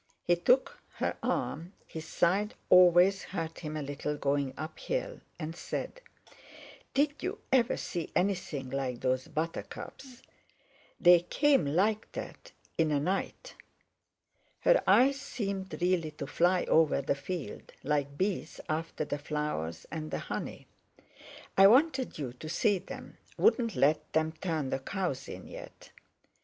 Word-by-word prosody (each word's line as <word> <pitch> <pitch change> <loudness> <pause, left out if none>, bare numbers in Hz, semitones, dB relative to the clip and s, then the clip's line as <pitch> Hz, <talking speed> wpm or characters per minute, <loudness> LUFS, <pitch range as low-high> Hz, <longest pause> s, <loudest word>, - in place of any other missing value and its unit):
He 175 - +3
took 250 +10 +2
her - - -1
arm—his 165 -2 -4
side 200 +7 +1 0.2
always 180 +2 +7
hurt 165 -4 -5
him 155 -2 -5
a 150 - -3
little 145 +1 -3
going 140 -1 0
uphill—and 160 - -5
said: - - -5 0.9
"Did 290 +2 +1
you 385 +4 -3 0.2
ever 245 -3 +3
see 170 -2 -4
anything 175 -9 -1
like 130 -3 -2
those 130 0 0
buttercups? 240 - -6 0.8
They 175 -1 +8
came 275 - +2
like 205 +9 +1
that - - -8 0.3
in 160 -1 +4
a 145 -1 +2
night." 195 - -2 1.1
Her - - +5
eyes 275 +2 +5
seemed 200 -8 -4
really 175 -3 +1
to 150 -2 -7
fly 175 +5 +2
over 160 -3 +3
the 140 - +1
field, 160 +3 -6
like 140 -1 -1
bees 190 +2 -2
after 160 -1 -2
the 145 - -3
flowers 145 - -3
and 155 -1 -4
the - - -2
honey. - - -5 0.9
"I 195 0 +8
wanted 265 +3 +3
you 135 -5 -4
to 155 +5 -9
see 200 +4 +2
them—wouldn't 230 - -1
let 150 +3 +2
them 160 0 +2
turn 160 -4 -3
the - - 0
cows 140 -4 -3
in 95 - -8
yet." - - -11
170 Hz, 130 wpm, -30 LUFS, 150-200 Hz, 1.1 s, They